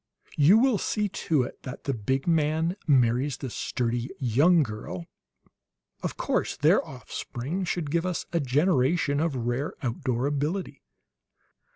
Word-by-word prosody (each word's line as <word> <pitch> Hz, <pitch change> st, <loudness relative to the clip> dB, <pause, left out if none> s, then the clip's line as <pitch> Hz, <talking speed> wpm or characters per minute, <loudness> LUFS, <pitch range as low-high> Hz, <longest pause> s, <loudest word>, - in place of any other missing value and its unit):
You 155 Hz, +9 st, +7 dB
will 240 Hz, -3 st, +3 dB
see 210 Hz, -1 st, 0 dB
to 155 Hz, -7 st, 0 dB
it -, -, -8 dB
that 130 Hz, -, -8 dB
the 140 Hz, -, -1 dB
big 130 Hz, +4 st, -1 dB
man 160 Hz, +1 st, +1 dB
marries 130 Hz, 0 st, +3 dB
the 130 Hz, -3 st, -6 dB
sturdy 120 Hz, +1 st, -2 dB
young 145 Hz, +7 st, +4 dB
girl, 105 Hz, -7 st, -6 dB, 1.0 s
of -, -, -4 dB
course; -, -, -1 dB
their -, -, +4 dB
offspring 160 Hz, +11 st, -5 dB
should 165 Hz, -4 st, -2 dB
give 170 Hz, +2 st, +1 dB
us 180 Hz, -, -2 dB
a 170 Hz, -, +2 dB
generation 145 Hz, +1 st, +2 dB
of 160 Hz, -3 st, 0 dB
rare 120 Hz, +4 st, -2 dB
outdoor 125 Hz, 0 st, -1 dB
ability. 145 Hz, +2 st, -2 dB
145 Hz, 140 wpm, -27 LUFS, 125-165 Hz, 1.0 s, You